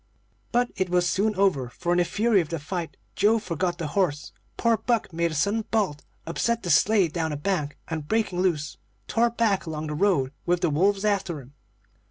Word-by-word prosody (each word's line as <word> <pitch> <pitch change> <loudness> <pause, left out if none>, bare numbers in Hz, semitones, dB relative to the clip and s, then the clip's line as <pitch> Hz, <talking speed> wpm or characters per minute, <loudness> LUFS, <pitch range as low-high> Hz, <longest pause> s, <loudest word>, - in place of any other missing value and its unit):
"But 245 0 +1
it 185 -1 0
was 175 0 +2
soon 210 +4 +1
over, 180 -10 +2
for 170 +8 -3
in 175 - +3
the 175 - +3
fury 210 +3 +2
of 160 - -6
the 165 - -2
fight 165 +2 -5 0.2
Joe 220 +2 +4
forgot 175 -3 -2
the 165 -4 -4
horse; 150 -4 -1 0.3
poor 230 -1 +3
Buck 230 -5 -1
made 170 +1 +1
a 155 - -5
sudden 200 +9 +1
bolt, 190 -10 0 0.2
upset 230 +8 -1
the 175 - 0
sleigh 200 +4 +4
down 160 0 -2
a 150 - -3
bank, 150 -3 -2
and, 160 -3 -4
breaking 210 -4 0
loose, 155 -5 -1 0.3
tore 235 +1 +2
back 225 -6 0
along 155 -1 -4
the 150 - -4
road 150 -6 +2
with 175 0 +1
the 170 - +2
wolves 195 +6 +2
after 195 -6 0
him. 135 +1 -14
180 Hz, 205 wpm, -25 LUFS, 155-205 Hz, 0.3 s, Joe